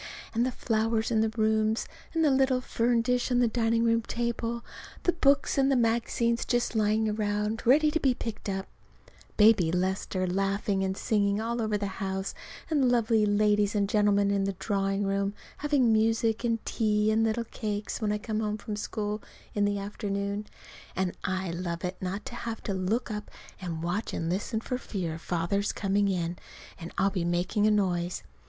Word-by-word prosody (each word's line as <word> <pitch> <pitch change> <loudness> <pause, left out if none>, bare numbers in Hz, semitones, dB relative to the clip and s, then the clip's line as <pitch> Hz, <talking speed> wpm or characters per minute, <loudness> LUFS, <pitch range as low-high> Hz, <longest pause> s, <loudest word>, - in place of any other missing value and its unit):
And 230 +1 +2
the - - -1
flowers 225 -1 0
in 220 -1 +3
the 220 - +2
rooms, 220 0 +1 0.3
and 325 -1 +3
the 295 - +4
little 265 -1 +3
fern 235 -1 +1
dish 250 +1 +1
on 245 - +2
the 245 -1 +4
dining 230 0 +1
room 230 0 +3
table, 235 0 -3 0.4
the 355 - +4
books 280 -3 +3
and 270 0 +4
magazines 235 0 +1
just 240 -1 0
lying 215 0 +2
around 210 +1 -1
ready 300 +4 +5
to 320 - 0
be 265 -4 +2
picked 225 -3 -5
up; 195 0 -2 0.7
Baby 210 -6 +5
Lester 185 +1 -1
laughing 195 +1 0
and 190 0 -1
singing 205 -1 +1
all 235 +1 -2
over 215 -1 0
the 205 - -3 0.2
house, 190 0 -2 0.3
and 285 -5 +2
lovely 225 -3 +3
ladies 205 0 +2
and 200 -1 +2
gentlemen 205 -1 +3
in 200 -1 +1
the 195 - -1
drawing 195 +1 -1
room 195 +1 0 0.2
having 280 -6 +3
music 225 +1 +2
and 230 -2 0
tea 210 -1 +1
and 220 +1 +3
little 225 +1 +1
cakes 210 0 -4
when 210 -1 +1
I 210 - +1
come 215 +1 -3
home 210 -1 -1
from 210 0 -5
school 210 0 -3 0.3
in 205 -1 +2
the 205 0 0
afternoon. 200 0 -3 0.5
And 185 -1 -1
I 185 -1 -1
love 170 0 -3
it 180 +1 -4
not 190 +3 -3
to - - -7
have 230 -1 -5
to 200 - -2
look 205 +6 -1
up 210 -1 -5 0.3
and 165 -3 -4
watch 180 +6 -2
and 165 0 -2
listen 210 +4 -2
for 250 +2 -3
fear 170 -9 -4
Father's 180 +5 -1
coming 200 0 +1
in 175 -2 -1 0.4
and 170 - -7
I'll 195 +1 +3
be 185 -4 -1
making 175 +5 +1
a - - +5
noise. 180 -4 0
210 Hz, 185 wpm, -28 LUFS, 195-230 Hz, 0.7 s, ready